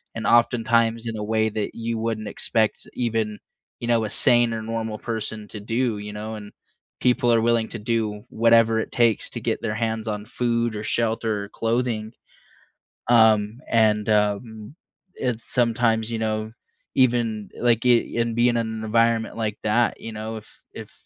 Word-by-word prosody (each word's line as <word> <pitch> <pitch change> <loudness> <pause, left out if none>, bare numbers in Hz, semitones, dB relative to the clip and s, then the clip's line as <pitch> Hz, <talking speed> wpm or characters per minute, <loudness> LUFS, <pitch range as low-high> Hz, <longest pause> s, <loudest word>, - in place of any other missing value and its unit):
and 115 - -3
oftentimes 115 -1 +2
in 115 - -3
a 105 - -4
way 110 +1 +1
that 105 -1 -4
you 115 0 -3
wouldn't 110 -1 -3
expect 110 -2 -1
even, 110 -3 -2 0.4
you 120 - -5
know, 115 -1 +2
a 105 - -4
sane 120 +1 +4
or 110 - -3
normal 110 -1 -4
person 110 -2 -4
to 105 - -7
do, 115 0 -1
you 105 0 -6
know, 110 +1 -5
and 105 -1 -9 0.5
people 125 -1 +3
are 115 - +3
willing 115 -1 +1
to 115 - -7
do 105 -1 -2
whatever 115 0 +4
it - - -4
takes 115 -3 +2
to - - -6
get - - -2
their 110 -2 -2
hands 110 0 -2
on 105 -1 -3
food 120 -1 -1
or 105 - -5
shelter 110 -2 0
or - - -14
clothing. 115 -1 -1 1.0
Um, 110 -1 +4
and, 110 -2 +2
um, 105 +3 -1 0.4
it's 125 -3 -2
sometimes, 115 -2 +1
you 115 - -2
know, 110 0 -2 0.4
even, 115 -5 +1
like, 120 0 +2
in 115 -1 +2
being 120 +1 +4
in 120 - -1
an 110 -1 -3
environment 115 +1 +1
like 110 -2 -2
that, 115 +2 +1
you 115 - -6
know, 110 +1 -5
if 110 - -15
if - - -9
115 Hz, 170 wpm, -23 LUFS, 110-115 Hz, 1.0 s, sane